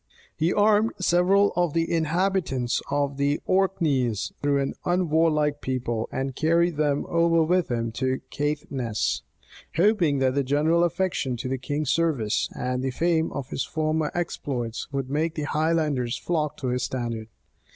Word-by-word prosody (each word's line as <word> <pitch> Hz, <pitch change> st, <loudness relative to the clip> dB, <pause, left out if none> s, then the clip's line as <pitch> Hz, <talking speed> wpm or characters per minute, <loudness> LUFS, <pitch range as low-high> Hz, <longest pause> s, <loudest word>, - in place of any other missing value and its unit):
He 165 Hz, +3 st, +1 dB
armed 210 Hz, +2 st, +3 dB
several 185 Hz, +3 st, +3 dB
of 175 Hz, -3 st, +1 dB
the 165 Hz, 0 st, 0 dB
inhabitants 165 Hz, -6 st, 0 dB
of 140 Hz, -1 st, 0 dB
the 140 Hz, +1 st, +1 dB
Orkneys, 150 Hz, -, +1 dB
though 145 Hz, -1 st, +2 dB
an 135 Hz, 0 st, -1 dB
unwarlike 160 Hz, -4 st, +1 dB
people, 120 Hz, -3 st, -2 dB
and 135 Hz, -1 st, -3 dB
carried 170 Hz, +2 st, +2 dB
them 145 Hz, -2 st, +1 dB
over 170 Hz, -1 st, +3 dB
with 180 Hz, +2 st, +1 dB
him 115 Hz, -2 st, -1 dB
to 130 Hz, +2 st, -1 dB
Caithness; 140 Hz, -6 st, -2 dB, 0.5 s
hoping 175 Hz, -4 st, +3 dB
that 130 Hz, -1 st, +2 dB
the 140 Hz, -, +1 dB
general 150 Hz, +5 st, +2 dB
affection 175 Hz, -7 st, -1 dB
to 125 Hz, -, -4 dB
the 130 Hz, 0 st, -2 dB
king's 145 Hz, +2 st, -2 dB
service, 145 Hz, -10 st, +1 dB
and 125 Hz, 0 st, -2 dB
the 130 Hz, -, -1 dB
fame 160 Hz, +4 st, +1 dB
of 140 Hz, -2 st, -5 dB
his -, -, -2 dB
former 155 Hz, -1 st, -1 dB
exploits, 130 Hz, -10 st, -3 dB
would 135 Hz, -2 st, -2 dB
make 160 Hz, +3 st, 0 dB
the 150 Hz, -, -3 dB
Highlanders 150 Hz, -6 st, 0 dB
flock 155 Hz, -4 st, -2 dB
to 130 Hz, -, -3 dB
his 125 Hz, 0 st, -1 dB
standard. 115 Hz, -3 st, -3 dB
150 Hz, 150 wpm, -25 LUFS, 130-170 Hz, 0.5 s, armed